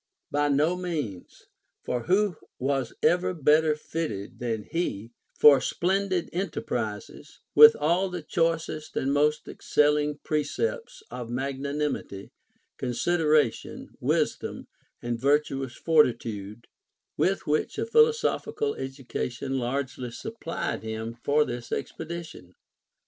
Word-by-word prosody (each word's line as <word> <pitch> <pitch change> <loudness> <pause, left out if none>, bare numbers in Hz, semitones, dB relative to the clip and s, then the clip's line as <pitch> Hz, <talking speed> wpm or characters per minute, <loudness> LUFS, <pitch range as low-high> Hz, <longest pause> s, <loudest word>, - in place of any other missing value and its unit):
By 145 +1 +2
no 150 +5 +2
means: 155 - -5 0.4
for 125 -2 -2
who 195 0 +2 0.2
was 135 -2 -1
ever 180 +1 +3
better 155 0 +4
fitted 150 -10 -5
than 115 -3 -2
he 115 - -3 0.3
for 140 -3 +8
splendid 190 0 0
enterprises, 125 - -4
with 150 +1 +10
all 170 +6 +1
the 180 -3 -5
choicest 165 -1 -1
and 135 +1 +1
most 150 +1 +2
excelling 150 0 +1
precepts 460 - -2
of 120 -2 -6
magnanim 140 +3 -2
ity, 100 0 -11 0.5
consideration, 150 +1 0
wisdom, - - -1 0.4
and 120 -1 -2
virtuous 135 -2 +1
fortitude, 115 -8 +1 0.5
with 195 +1 +1
which 150 +1 0
a - - -1
philosophical 455 -1 +2
education 135 0 -4
largely 130 0 -3
supplied 170 - -4
him 110 +1 -5
for 150 +1 +3
his 120 -1 -6
expedition"? 160 - -6
150 Hz, 105 wpm, -27 LUFS, 125-170 Hz, 0.5 s, with